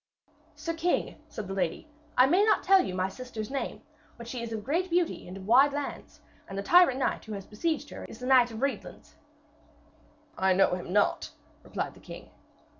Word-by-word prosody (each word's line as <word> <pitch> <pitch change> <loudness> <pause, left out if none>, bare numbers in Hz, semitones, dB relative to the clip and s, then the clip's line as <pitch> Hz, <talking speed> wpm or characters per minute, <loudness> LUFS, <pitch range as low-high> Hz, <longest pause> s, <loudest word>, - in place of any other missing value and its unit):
'Sir 310 +3 -4
king,' 335 +2 -1
said 210 - -6
the 195 - -4
lady, 185 - -2 0.3
'I 250 - +8
may 355 +9 +4
not 435 - +3
tell 385 0 +5
you - - -4
my 185 0 0
sister's 225 +2 -7
name, 275 - -4 0.3
but 235 -1 -10
she 240 0 -5
is 235 -1 -5
of 220 -2 -4
great 340 - -1
beauty 345 - 0
and 185 +2 -8
of 190 - -10
wide 265 +6 +5
lands. 290 0 -6 0.3
And 195 - -7
the 200 - -2
tyrant 345 - +6
knight 265 - -1
who 215 -3 -5
besieges 290 - -3
her - - -8
is - - -11
the 250 - -7
Red - - -2
Knight 245 -1 +5
of 225 0 -8
Reedlands.' 280 - -4 1.3
'I 190 0 +4
know 195 0 +3
him 180 -1 -4
not,' 205 +1 +1 0.3
replied - - -4
the - - -17
king. - - -11
250 Hz, 200 wpm, -28 LUFS, 200-305 Hz, 1.3 s, I